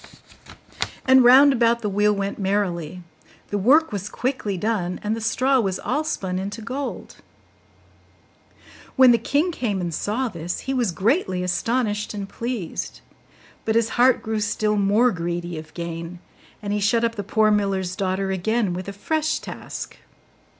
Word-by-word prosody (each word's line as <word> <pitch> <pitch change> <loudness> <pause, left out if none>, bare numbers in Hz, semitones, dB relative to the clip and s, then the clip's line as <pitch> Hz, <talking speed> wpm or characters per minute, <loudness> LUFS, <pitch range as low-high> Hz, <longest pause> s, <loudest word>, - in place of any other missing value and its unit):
And 260 0 +6
round 270 +3 +8
about 235 -1 +2
the - - 0
wheel 205 +1 +2
went 200 0 -3
merrily; 180 -4 -1 0.5
the 205 - 0
work 290 +11 +4
was 200 0 -4
quickly 245 -7 -2
done, 185 -3 -1
and 210 +1 0
the 225 - -6
straw 260 +4 +2
was 190 -5 0
all 290 +5 -1
spun 185 -11 -3
into 200 +4 -5
gold. 265 +5 -5 1.8
When 260 -2 +7
the 235 - +4
king 290 +10 +1
came 220 - -2
and 175 -2 -3
saw 220 +10 -1
this, 170 -4 -5
he 270 - -3
was 245 -7 +1
greatly 190 - 0
astonished 210 +3 -1
and 200 -1 -4
pleased; 230 -6 -5 0.6
but 220 - 0
his 230 -1 +2
heart 250 +1 +3
grew 220 0 -2
still 210 0 0
more 210 +5 +3
greedy 175 -1 -4
of 155 - -12
gain, 170 0 -5 0.5
and 205 0 -2
he 210 - 0
shut 230 +3 +2
up 230 0 +1
the 205 -3 -5
poor 215 +2 +2
miller's 195 -3 0
daughter 190 -1 -1
again 205 +1 0
with 185 +2 -5
a 200 - -5
fresh 315 +9 -1
task. - - -8
210 Hz, 160 wpm, -23 LUFS, 190-240 Hz, 1.8 s, round